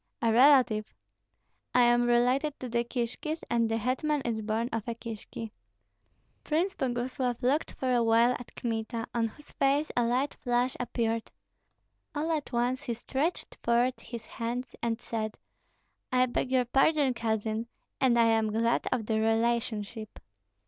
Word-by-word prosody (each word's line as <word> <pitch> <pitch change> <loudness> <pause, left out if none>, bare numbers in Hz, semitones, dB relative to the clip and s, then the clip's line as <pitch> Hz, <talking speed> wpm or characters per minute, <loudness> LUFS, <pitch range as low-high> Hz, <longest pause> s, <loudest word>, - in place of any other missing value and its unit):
"A 230 -1 +2
relative?" 250 -4 +5 0.8
"I 250 - +7
am 240 0 +4
related 250 +5 +2
to 255 - -5
the 235 0 0
Kishkis, 245 +6 -3
and 230 -1 +2
the 225 - +1
hetman 270 +6 0
is 225 -2 -1
born 220 +2 -1
of 225 -1 -3
a 235 - -2
Kishki." 225 -1 -7 0.9
Prince 340 +5 0
Boguslav 245 -2 -2
looked 280 +5 +1
for 255 -1 0
a 240 - +3
while 230 +1 +4
at 245 - -12
Kmita, 225 0 -3
on 230 -1 +1
whose 295 +7 -14
face 280 +3 +1
a 245 - +3
light 250 +5 +1
flush 245 0 0
appeared. 230 -2 -1 0.9
All 310 +3 -1
at 305 -3 -2
once 245 +2 0
he 235 - -3
stretched 275 +8 -2
forth 240 +2 +2
his 235 -1 -8
hands 240 +2 -4
and 230 -1 -1
said, 220 -2 -4 0.7
"I 255 0 +4
beg 255 +1 -2
your 255 -1 +3
pardon, 275 +2 +3
cousin, 220 -1 -2 0.3
and 250 -3 +4
I 230 - +5
am 225 -1 +2
glad 230 +2 +1
of 240 -4 0
the 220 0 0
relationship." 225 -1 -1
240 Hz, 155 wpm, -29 LUFS, 225-255 Hz, 0.9 s, I